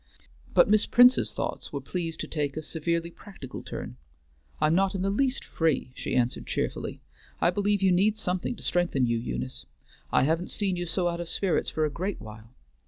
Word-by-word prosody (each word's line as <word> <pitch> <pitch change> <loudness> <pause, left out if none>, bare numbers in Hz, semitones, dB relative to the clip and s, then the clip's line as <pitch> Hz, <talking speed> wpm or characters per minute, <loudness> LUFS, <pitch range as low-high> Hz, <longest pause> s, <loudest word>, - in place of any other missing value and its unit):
But - - +6
Miss 215 0 +4
Prince's 245 +1 +6
thoughts - - -4
were 140 - -3
pleased 165 +3 -4
to - - -4
take 145 -2 -2
a 155 - -3
severely 170 +2 -2
practical 170 -8 -9
turn: 60 - -7 0.6
"I'm 155 +1 +3
not 195 +2 +2
in 185 - -1
the 195 - +1
least 260 +5 +1
free," 155 -6 0
she - - -3
answered 125 -1 0
cheerfully. - - -3 0.4
"I 175 - +3
believe 205 +1 +1
you 190 - +5
need 205 +4 +3
something 180 +4 -2
to - - -12
strengthen 175 -7 +1
you, 115 -1 +1
Eunice. 65 - -5 0.4
I - - +4
haven't 160 +5 +1
seen 195 -3 -1
you 175 0 -3
so 175 +2 0
out 170 0 -2
of 170 - -3
spirits 190 -1 +1
for 155 - 0
a 150 - -1
great 185 +6 -3
while. 110 +1 -11
170 Hz, 195 wpm, -27 LUFS, 140-195 Hz, 0.6 s, But